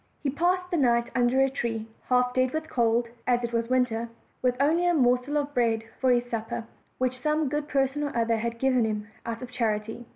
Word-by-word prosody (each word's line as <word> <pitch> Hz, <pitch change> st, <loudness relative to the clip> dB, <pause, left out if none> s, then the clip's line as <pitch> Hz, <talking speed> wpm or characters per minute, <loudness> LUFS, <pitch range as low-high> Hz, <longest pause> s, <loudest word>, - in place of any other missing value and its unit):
He 275 Hz, -, 0 dB
passed 360 Hz, +5 st, 0 dB
the 345 Hz, -, +1 dB
night 235 Hz, -4 st, +2 dB
under 250 Hz, +1 st, +3 dB
a 270 Hz, -, +4 dB
tree, 225 Hz, -4 st, -3 dB, 0.2 s
half 250 Hz, 0 st, +3 dB
dead 255 Hz, 0 st, +1 dB
with 315 Hz, 0 st, -2 dB
cold 235 Hz, 0 st, +2 dB, 0.2 s
(as 245 Hz, -1 st, +2 dB
it 235 Hz, 0 st, -3 dB
was 230 Hz, 0 st, 0 dB
winter), 240 Hz, -3 st, +1 dB, 0.3 s
with 250 Hz, -1 st, +1 dB
only 325 Hz, +5 st, +3 dB
a 350 Hz, -, +3 dB
morsel 250 Hz, +1 st, +2 dB
of 290 Hz, 0 st, -2 dB
bread 230 Hz, -3 st, +1 dB, 0.2 s
for 260 Hz, -, +2 dB
his 245 Hz, -1 st, +3 dB
supper, 225 Hz, -1 st, -4 dB, 0.3 s
which 255 Hz, 0 st, -1 dB
some 305 Hz, -1 st, +1 dB
good 295 Hz, +1 st, -2 dB
person 275 Hz, +1 st, 0 dB
or 285 Hz, -4 st, -2 dB
other 230 Hz, 0 st, +2 dB
had 235 Hz, +1 st, -3 dB
given 255 Hz, -1 st, +2 dB
him 210 Hz, -1 st, -2 dB, 0.2 s
out 230 Hz, +1 st, -4 dB
of 250 Hz, -, -8 dB
charity. 225 Hz, -1 st, -2 dB
250 Hz, 215 wpm, -27 LUFS, 230-275 Hz, 0.3 s, a